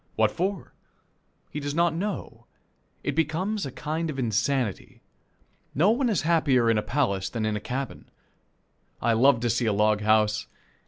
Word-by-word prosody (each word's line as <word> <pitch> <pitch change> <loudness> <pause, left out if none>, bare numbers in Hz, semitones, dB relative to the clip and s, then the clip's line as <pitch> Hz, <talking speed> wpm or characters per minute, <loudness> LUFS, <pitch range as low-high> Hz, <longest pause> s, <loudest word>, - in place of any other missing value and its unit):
What - - +3
for? 190 +1 -3 0.8
He 150 - -4
does 145 0 -4
not 170 0 +3
know. 165 - -5 0.6
It - - 0
becomes 165 +6 -1
a - - -7
kind 160 +4 -3
of 145 - -5
insanity. 120 -1 -1 0.8
No 175 +9 +4
one 245 +2 +1
is 205 -8 0
happier 145 -8 +3
in 110 - +2
a - - 0
palace 100 -8 -1
than 110 +1 -3
in 110 -1 0
a - - -2
cabin. 130 +3 -5 0.9
I 115 0 +2
love 125 +1 +4
to 120 - 0
see 115 +1 0
a 110 - +2
log 105 +1 +2
house. 105 0 +2
135 Hz, 165 wpm, -26 LUFS, 110-160 Hz, 0.9 s, No